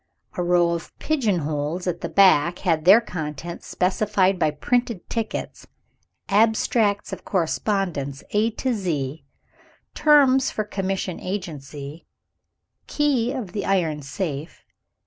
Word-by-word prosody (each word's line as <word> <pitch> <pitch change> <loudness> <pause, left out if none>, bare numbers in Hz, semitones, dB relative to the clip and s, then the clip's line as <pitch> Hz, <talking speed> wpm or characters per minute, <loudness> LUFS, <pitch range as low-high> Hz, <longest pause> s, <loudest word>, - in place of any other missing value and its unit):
A - - -3
row 175 -1 +3
of 170 0 -5
"pigeon 230 - 0
holes" 150 +4 -3
at 175 -2 -2
the - - -3
back 175 -3 +4
had 160 -3 +1
their 200 +6 +8
contents 165 -4 -6
specified 190 0 +1
by 155 - +3
printed 235 - -1
tickets. 225 -2 -4 0.6
"Abstracts 215 -1 +2
of - - -7
correspondence, 170 -6 -1
A 215 +2 +2
to 250 +3 -2
Z;" 160 - -3 0.7
"Terms 275 -3 +4
for 215 - -2
commission 195 -3 -3
agency;" 155 -5 -6 0.8
"Key 270 -5 +1
of 250 -9 -5
the 205 +1 -3
iron 165 -6 0
safe." 145 +1 -5
185 Hz, 120 wpm, -23 LUFS, 160-215 Hz, 0.8 s, their